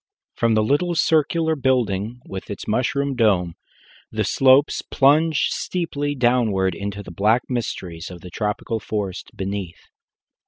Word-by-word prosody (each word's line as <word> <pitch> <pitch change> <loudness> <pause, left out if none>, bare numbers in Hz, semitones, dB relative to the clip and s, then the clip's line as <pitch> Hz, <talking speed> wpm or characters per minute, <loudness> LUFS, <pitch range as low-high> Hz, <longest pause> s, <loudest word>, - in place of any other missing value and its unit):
From 115 -1 +1
the 110 - +3
little 160 +9 +1
circular 160 +1 +2
building, 125 -4 0
with 95 -1 -7
its 100 - -6
mushroom 135 +4 0
dome, 95 -8 +2 0.6
the - - -1
slopes 135 +2 +4
plunge 150 +3 +3
steeply 145 -5 -2
downward 115 -7 +2
into 100 +3 -5
the - - -10
black 105 +7 +2
mysteries 90 -9 -4
of 90 -2 -10
the 90 - -10
tropical 105 +3 -2
forest 100 -4 -4
beneath. 95 -2 -5
115 Hz, 130 wpm, -22 LUFS, 100-140 Hz, 0.6 s, slopes